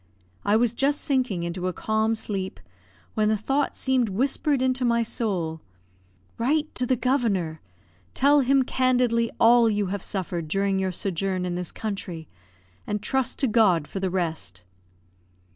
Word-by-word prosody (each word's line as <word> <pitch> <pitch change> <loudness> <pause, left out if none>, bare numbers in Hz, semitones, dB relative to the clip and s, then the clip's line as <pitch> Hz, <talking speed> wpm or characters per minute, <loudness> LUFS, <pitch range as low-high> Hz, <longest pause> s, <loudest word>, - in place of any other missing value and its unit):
I 205 - +2
was 230 0 +2
just 280 +4 +1
sinking 250 -11 0
into 175 +2 -3
a 185 - -2
calm 220 +4 0
sleep 195 -3 -4 0.5
when 215 0 +1
the 215 - +2
thought 270 +7 -1
seemed 260 -4 +1
whispered 270 +6 +1
into 255 0 0
my 235 -1 +2
soul, 180 -9 -2 0.8
"Write 300 +6 0
to 250 - -2
the 255 - +3
Governor; 215 - 0 0.5
tell 290 +2 +5
him 270 0 +3
candidly 250 -3 +1
all 235 0 +6
you 205 -1 0
have 200 - -3
suffered 180 -5 -3
during 195 +3 0
your 190 -1 0
sojourn 185 0 -2
in 180 - -2
this 180 -1 -3
country; 185 -7 -5 0.6
and 210 0 -3
trust 260 +2 0
to - - +2
God 205 -9 +3
for 195 - -5
the 190 -1 -1
rest." 160 - -3
215 Hz, 155 wpm, -25 LUFS, 185-250 Hz, 0.8 s, all